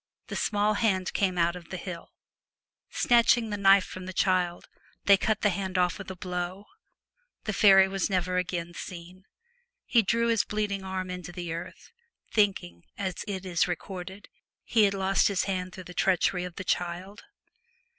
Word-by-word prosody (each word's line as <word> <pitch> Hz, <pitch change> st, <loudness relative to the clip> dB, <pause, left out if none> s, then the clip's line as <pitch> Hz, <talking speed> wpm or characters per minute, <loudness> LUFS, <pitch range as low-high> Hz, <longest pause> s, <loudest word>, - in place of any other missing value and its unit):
The -, -, -4 dB
small 210 Hz, 0 st, +1 dB
hand 195 Hz, -4 st, 0 dB
came 185 Hz, -2 st, 0 dB
out 170 Hz, 0 st, +2 dB
of 175 Hz, -2 st, -11 dB
the 190 Hz, -, -5 dB
hill. 175 Hz, -2 st, -8 dB, 0.8 s
Snatching 235 Hz, -2 st, +3 dB
the -, -, -1 dB
knife 195 Hz, -1 st, +5 dB
from 185 Hz, 0 st, -8 dB
the 185 Hz, -, -6 dB
child, 180 Hz, -2 st, 0 dB, 0.4 s
they 200 Hz, -, +8 dB
cut 215 Hz, +1 st, 0 dB
the 205 Hz, -, +3 dB
hand 190 Hz, 0 st, -3 dB
off 180 Hz, +1 st, +1 dB
with 195 Hz, -, -8 dB
a 190 Hz, -, -6 dB
blow. 180 Hz, +1 st, -4 dB, 0.8 s
The 215 Hz, -, -2 dB
faery 195 Hz, -2 st, +7 dB
was 195 Hz, +1 st, -1 dB
never 185 Hz, -1 st, 0 dB
again 175 Hz, -1 st, -2 dB
seen. 180 Hz, +2 st, -9 dB, 0.6 s
He 235 Hz, -, +4 dB
drew 230 Hz, +3 st, +1 dB
his 230 Hz, -2 st, +3 dB
bleeding 205 Hz, -2 st, -2 dB
arm 190 Hz, -1 st, -4 dB
into 180 Hz, -1 st, -6 dB
the 175 Hz, -2 st, -5 dB
earth, 165 Hz, -, -8 dB, 0.4 s
thinking, 190 Hz, -, +1 dB, 0.2 s
as 190 Hz, -3 st, -3 dB
it 190 Hz, -2 st, -4 dB
is 175 Hz, -2 st, +1 dB
recorded, 190 Hz, +2 st, -6 dB, 0.4 s
he 220 Hz, -3 st, +3 dB
had 200 Hz, 0 st, +1 dB
lost 195 Hz, 0 st, +2 dB
his 200 Hz, -3 st, 0 dB
hand 185 Hz, -2 st, -3 dB
through 185 Hz, -, -8 dB
the 180 Hz, -, -11 dB
treachery 180 Hz, 0 st, +1 dB
of 180 Hz, -2 st, -8 dB
the 195 Hz, -, -5 dB
child. 180 Hz, +3 st, -3 dB
190 Hz, 175 wpm, -28 LUFS, 180-200 Hz, 0.8 s, they